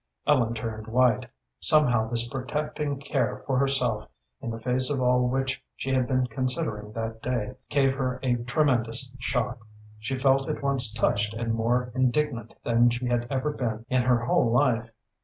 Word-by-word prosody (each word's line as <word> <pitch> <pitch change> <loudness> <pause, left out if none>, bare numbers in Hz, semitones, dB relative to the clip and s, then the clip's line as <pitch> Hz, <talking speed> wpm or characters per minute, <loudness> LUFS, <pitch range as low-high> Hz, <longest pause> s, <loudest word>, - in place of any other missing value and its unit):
Ellen 120 -6 +2
turned 110 -1 -5
white. 125 +1 +2 0.3
Somehow 125 -8 +3
this 120 0 +1
protecting 140 +3 -3
care 135 -5 -2
for 130 -2 +1
herself, 130 -6 +1 0.3
in - - -4
the 115 0 -5
face 125 +2 +2
of 145 -2 0
all 125 0 +3
which 130 +1 -1
she 135 - -4
had 130 -2 +2
been 130 0 +1
considering 115 -4 -2
that 115 0 -4
day, 125 -2 -2 0.2
gave 135 -2 +3
her 130 -2 -2
a 125 -2 +2
tremendous 125 -1 +1
shock. 125 0 -1 0.4
She 115 +5 -3
felt 135 0 +2
at - - -3
once 135 -5 +2
touched 105 -1 0
and 115 0 -2
more 120 +2 0
indignant 130 -2 0
than 120 +1 +4
she 120 +1 -3
had 120 -1 0
ever 140 +2 -1
been 115 -4 -3
in 130 0 +3
her 120 -1 +2
whole 120 -1 +3
life. 120 -3 +2
125 Hz, 170 wpm, -26 LUFS, 115-135 Hz, 0.4 s, than